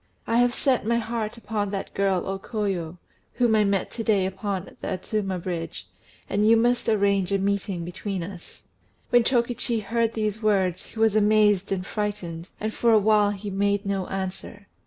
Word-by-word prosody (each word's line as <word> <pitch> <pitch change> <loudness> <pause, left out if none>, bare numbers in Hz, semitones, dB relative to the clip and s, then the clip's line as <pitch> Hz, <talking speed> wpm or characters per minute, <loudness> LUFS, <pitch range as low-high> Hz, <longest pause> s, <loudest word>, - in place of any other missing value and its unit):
I 230 - +1
have 245 0 +4
set 255 0 +1
my 235 +2 +1
heart 230 -1 -3
upon 215 -3 -2
that 195 -1 -5
girl 195 -2 +1
O 195 0 -3
Koyo, 190 -6 -3 0.4
whom 240 -3 +2
I 215 -1 +4
met 200 -2 0
to 225 - -4
day 205 -4 +2
upon 190 0 -4
the - - -4
Adzuma 195 0 -2
Bridge, 170 -2 -5 0.4
and 205 +1 +1
you 225 +1 +6
must 240 +1 +2
arrange 200 -3 +2
a 200 - +3
meeting 195 -3 -1
between 185 +1 -4
us." 175 -1 -10 0.5
When 245 -1 +6
Chokichi 235 -2 0
heard 230 +2 0
these 215 -1 -1
words, 195 -5 +1
he 220 - -10
was 220 -2 +3
amazed 210 -2 +3
and 185 -1 -1
frightened, 190 -5 -4
and 215 +1 -2
for 235 - +2
a 220 - +7
while 210 0 +4
he 205 0 -5
made 200 +1 0
no 195 -2 -1
answer. 195 +1 -5
205 Hz, 180 wpm, -25 LUFS, 195-220 Hz, 0.5 s, a